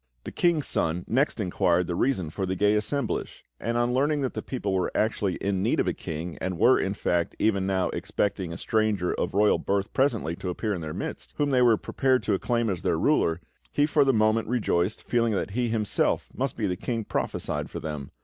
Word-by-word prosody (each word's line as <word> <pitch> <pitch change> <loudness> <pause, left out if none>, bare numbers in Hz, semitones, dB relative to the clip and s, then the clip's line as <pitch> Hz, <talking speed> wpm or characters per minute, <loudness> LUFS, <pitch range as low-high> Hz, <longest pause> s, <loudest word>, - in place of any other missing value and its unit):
The - - -6
King's 170 -5 +2
Son 85 +2 0
next 135 +1 +1
inquired 90 -2 +1
the 85 - -3
reason 95 - 0
for 95 +3 -3
the 95 - -1
gay 105 +3 +3
assemblage; 115 +4 -2
and 115 +2 -1
on 120 +1 +1
learning 145 +3 +2
that 130 - -1
the - - -3
people 105 -7 -3
were 95 -1 0
actually 105 -3 0
in 95 -1 -1
need - - +1
of - - +1
a - - +1
king, 80 +2 -6
and 95 -2 -2
were, 130 +8 +5
in 95 +1 -1
fact, 85 -3 0
even 100 -3 +1
now 95 -1 +1
expecting 95 0 -2
a 85 - -5
stranger 110 -5 0
of - - -2
royal 105 +1 +4
birth 100 0 -1
presently 115 - +1
to 90 - -4
appear 105 +4 -2
in 90 - -4
their 80 -1 -5
midst, - - -6
whom 145 -1 +1
they 130 -1 +4
were 120 -3 +5
prepared 130 +2 +1
to - - +1
acclaim 120 -1 0
as 95 -5 -2
their - - +1
ruler, 80 +1 +2 0.3
he 145 - +3
for 150 -1 +3
the 135 - +4
moment, 110 -1 +2
rejoiced, 105 -5 0
feeling 115 -2 +1
that 100 - -2
he, 120 +3 0
himself, 110 -2 0
must 135 0 -2
be 110 - -1
the 90 -2 0
King 115 +4 -3
prophesied - - -3
for - - -6
them. 75 -3 -5
105 Hz, 220 wpm, -26 LUFS, 90-120 Hz, 0.3 s, were